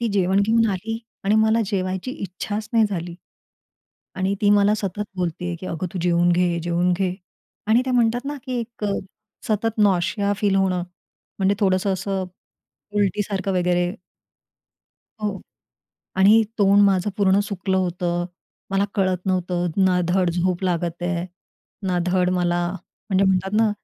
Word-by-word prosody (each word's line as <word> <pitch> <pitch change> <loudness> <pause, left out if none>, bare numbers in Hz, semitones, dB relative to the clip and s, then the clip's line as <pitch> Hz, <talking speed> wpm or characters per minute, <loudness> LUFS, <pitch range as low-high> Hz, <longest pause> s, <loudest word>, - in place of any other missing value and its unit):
ती 235 - 0
जेवण 190 0 +2
घेऊन 225 +2 +3
आली 215 +4 -3 0.3
आणि 205 +2 +3
मला 220 +1 +3
जेवायची 190 +2 -2
इच्छाच 205 0 -5
नाही 225 -1 +5
झाली 175 -3 -4 1.0
आणि 190 +1 0
ती 205 - +4
मला 205 0 +5
सतत 205 -1 -3
बोलते 175 -1 -3
की 185 - -8
"अगं 165 0 -3
तू 185 - -3
जेवून 175 0 +3
घे, 175 -1 +1
जेवून 175 +1 +1
घे" 185 0 0 0.5
आणि 230 +3 +4
त्या 255 - -1
म्हणतात 240 +1 +2
ना, 290 +1 -3
की 255 -2 -2
एक 230 -1 -7
अ, 205 - +1 0.6
सतत 220 +1 0
नॉशिया 200 0 +2
फील 200 -2 +1
होणं. 185 -2 +1 0.6
म्हणजे 195 +1 +2
थोडंसं 190 -1 +2
असं 190 +1 -2 0.7
उलटीसारखं 200 -1 0
वगैरे 180 0 +1 1.3
हो. 205 -2 -2 0.8
आणि 205 +4 +6 0.2
तोंड 200 0 +5
माझं 195 0 +2
पूर्ण 195 -1 +3
सुकलं 195 -2 -2
होतं 175 -1 -1 0.5
मला 195 +1 +2
कळत 185 -2 0
नव्हतं. 180 -1 0 0.2
ना 180 -1 +3
धड 180 -1 +2
झोप 180 +1 -1
लागत 175 -1 -1
आहे, 175 0 -1 0.6
ना 180 -1 +1
धड 180 0 +2
मला 175 -1 +1 0.4
म्हणजे 195 0 +3
म्हणतात 190 0 +1
ना, 225 -1 +4
190 Hz, 150 wpm, -22 LUFS, 180-205 Hz, 1.3 s, आणि